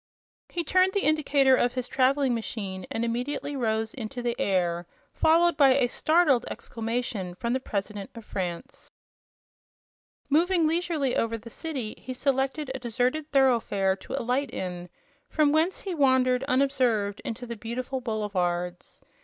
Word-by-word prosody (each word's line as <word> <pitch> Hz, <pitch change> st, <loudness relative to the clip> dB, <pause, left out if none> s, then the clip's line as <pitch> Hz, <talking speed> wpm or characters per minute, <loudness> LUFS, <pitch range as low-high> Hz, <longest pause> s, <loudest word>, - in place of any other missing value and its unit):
He 345 Hz, -, -2 dB
turned 370 Hz, +3 st, +3 dB
the 400 Hz, -, 0 dB
indicator 285 Hz, -3 st, +4 dB
of 245 Hz, -1 st, +1 dB
his 255 Hz, -1 st, -3 dB
traveling 265 Hz, 0 st, +2 dB
machine 200 Hz, -5 st, -4 dB
and 230 Hz, -, -1 dB
immediately 255 Hz, +5 st, -3 dB
rose 220 Hz, -3 st, -1 dB
into 245 Hz, 0 st, -6 dB
the 240 Hz, -1 st, 0 dB
air, 175 Hz, -3 st, 0 dB, 0.3 s
followed 335 Hz, +1 st, +4 dB
by 275 Hz, -3 st, +6 dB
a 270 Hz, -2 st, +3 dB
startled 305 Hz, 0 st, +3 dB
exclamation 225 Hz, -5 st, -4 dB
from 235 Hz, +5 st, -2 dB
the 260 Hz, -, +1 dB
President 200 Hz, -4 st, -4 dB
of 230 Hz, -2 st, -10 dB
France. 175 Hz, -3 st, -5 dB, 1.4 s
Moving 335 Hz, +3 st, +3 dB
leisurely 315 Hz, -4 st, 0 dB
over 230 Hz, 0 st, 0 dB
the 230 Hz, +1 st, -12 dB
city, 270 Hz, -9 st, -4 dB
he 255 Hz, -, -7 dB
selected 270 Hz, +1 st, 0 dB
a 265 Hz, -, -5 dB
deserted 250 Hz, +5 st, -1 dB
thoroughfare 230 Hz, -8 st, +3 dB
to -, -, -9 dB
alight 255 Hz, +4 st, 0 dB
in, 180 Hz, -1 st, -5 dB, 0.4 s
from 300 Hz, -2 st, +3 dB
whence 320 Hz, +5 st, +1 dB
he 385 Hz, -, -4 dB
wandered 260 Hz, -4 st, +3 dB
unobserved 255 Hz, -7 st, +1 dB
into 235 Hz, +2 st, -5 dB
the 235 Hz, -1 st, -5 dB
beautiful 245 Hz, +4 st, -4 dB
boulevards. 180 Hz, -6 st, -2 dB
250 Hz, 145 wpm, -27 LUFS, 220-280 Hz, 1.4 s, by